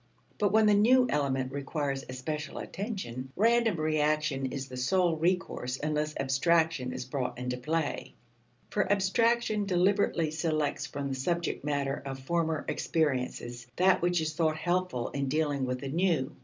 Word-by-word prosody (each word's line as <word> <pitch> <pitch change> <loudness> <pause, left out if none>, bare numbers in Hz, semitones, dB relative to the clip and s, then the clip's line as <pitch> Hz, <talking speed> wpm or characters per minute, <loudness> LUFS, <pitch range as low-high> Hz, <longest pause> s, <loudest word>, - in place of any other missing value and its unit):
But 205 -2 +2
when 220 +1 +5
the 210 - +5
new 250 +5 +5
element 135 -3 0
requires 140 0 -2
especial 150 +3 -4
attention, 135 - -5
random 230 -1 +3
reaction 155 -3 +1
is 135 +1 -5
the 130 - -9
sole 170 +7 +2
recourse 160 -7 -1
unless 150 0 -1
abstraction 135 0 +2
is - - -5
brought 125 -2 -3
into 125 0 -3
play. 155 +4 -2 0.6
For 185 - +1
abstraction 215 +2 +2
deliberately 180 -3 +2
selects 155 -2 -1
from 140 0 -4
the - - -2
subject 170 +6 -2
matter 140 -1 -1
of 135 -1 -5
former 160 +3 -1
experiences 125 -5 -1
that 185 +1 +4
which 175 0 +2
is 155 0 -2
thought 155 -1 +1
helpful 175 -7 -1
in 140 -1 -2
dealing 145 -1 0
with 125 0 -3
the 135 - -4
new. 165 -4 0
155 Hz, 150 wpm, -29 LUFS, 135-180 Hz, 0.6 s, when